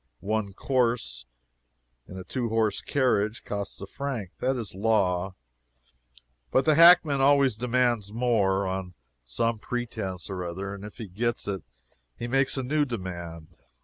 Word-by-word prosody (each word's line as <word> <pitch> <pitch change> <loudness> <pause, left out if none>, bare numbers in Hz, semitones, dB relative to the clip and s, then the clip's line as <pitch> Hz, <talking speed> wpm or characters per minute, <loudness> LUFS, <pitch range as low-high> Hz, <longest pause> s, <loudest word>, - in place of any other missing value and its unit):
One 105 -1 -2
"course," 115 - 0 0.8
in 95 - -9
a 95 - -6
two 120 +3 -3
horse 110 -2 +1
carriage, 120 -5 +1
costs 100 -1 -4
a - - -4
franc 120 -6 -5
that 130 +1 +1
is 115 -4 -5
law 95 -3 +1 1.1
but 130 - +2
the 155 - +5
hackman 165 -3 +7
always 140 -3 +4
demands 120 -3 +1
more, 105 -5 +1
on 95 -1 -4 0.3
some 110 - -1
pretence 110 -7 -4
or 95 -2 -4
other, 95 +3 -5
and 100 0 -9
if 105 - -9
he 110 - -6
gets 115 +6 -2
it 100 -2 -2 0.6
he 120 - -4
makes 135 +2 +1
a 130 - -1
new 150 +4 +1
demand. 85 - -6
110 Hz, 145 wpm, -27 LUFS, 95-125 Hz, 1.1 s, hackman